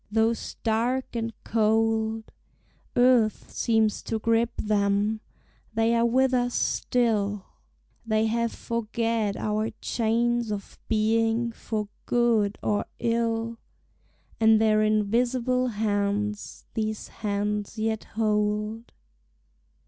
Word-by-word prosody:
Though 225 +1 +3
stark 235 +3 -2
and 230 0 -2
cold 220 0 +1 0.6
Earth 245 -3 +3
seems 220 -2 +1
to 225 - -2
grip 230 +1 +2
them, 210 +1 +1 0.5
they 225 +1 +3
are 235 0 +3
with 260 +2 +2
us 245 -1 +1
still: 210 -5 0 0.6
They 220 -1 +1
have 230 +1 0
forged 230 -1 -5 0.4
our 215 +1 -1
chains 235 0 0
of 200 -1 -6
being 225 +2 +1
for 215 -2 -4 0.2
good 230 -4 +2
or 205 -1 0
ill; 230 0 -1 0.8
And 220 -1 +5
their 215 -1 +3
invisible 240 +4 +1
hands 210 -1 -2
these 215 -1 -3
hands 210 0 -2
yet 220 0 -1
hold. 210 +1 0
225 Hz, 100 wpm, -26 LUFS, 215-235 Hz, 0.8 s, And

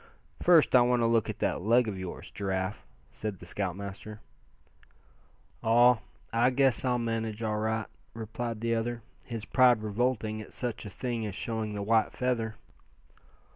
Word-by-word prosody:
"First, 170 -6 +5
I 125 - +8
want 120 0 +3
to - - +3
look 115 -2 +2
at - - -4
that - - -1
leg 115 +4 +4
of 100 -3 -4
yours, 95 -1 -7
Giraffe," 95 0 -3 0.2
said 105 -3 -5
the 90 - -12
scoutmaster. 100 +3 -5 1.4
"Aw! 120 +1 +5 0.6
guess 135 -4 +3
I'll 125 -1 +2
manage 115 -1 -2
all 105 -1 0
right," 110 0 -1 0.3
replied 115 0 -4
the 115 0 +1
other, 115 0 -2 0.2
his 115 -3 -5
pride 125 -4 +4
revolting 110 0 -1
at 110 - -11
such 120 -3 -4
a - - -6
thing 120 +4 -3
as 100 - -6
showing 110 0 -3
the 100 - -3
white 110 +1 +2
feather. 115 -3 -1
110 Hz, 155 wpm, -29 LUFS, 105-120 Hz, 1.4 s, I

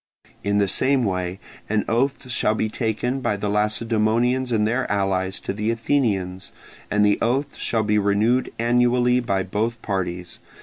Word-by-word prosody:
In 100 0 +1
the 100 -1 +3
same 130 +7 +2
way 90 -2 -2 0.3
an 105 0 +1
oath 130 +3 0
shall 110 -2 +1
be 110 - -1
taken 120 +3 -2
by 105 -5 -1
the 105 0 -2
Lacedaemonians 115 +4 +1
and 105 -2 +2
their 120 +1 -1
allies 95 -2 0
to - - -3
the 105 +2 -2
Athenians: 110 -7 -1 0.4
and 105 0 +3
the 105 - +3
oath 135 +5 0
shall 110 -2 0
be 105 0 +2
renewed 105 +5 +1
annually 125 +1 +3
by 100 -6 0
both 110 +5 -2
parties. 90 -3 -3
110 Hz, 160 wpm, -23 LUFS, 100-120 Hz, 0.4 s, the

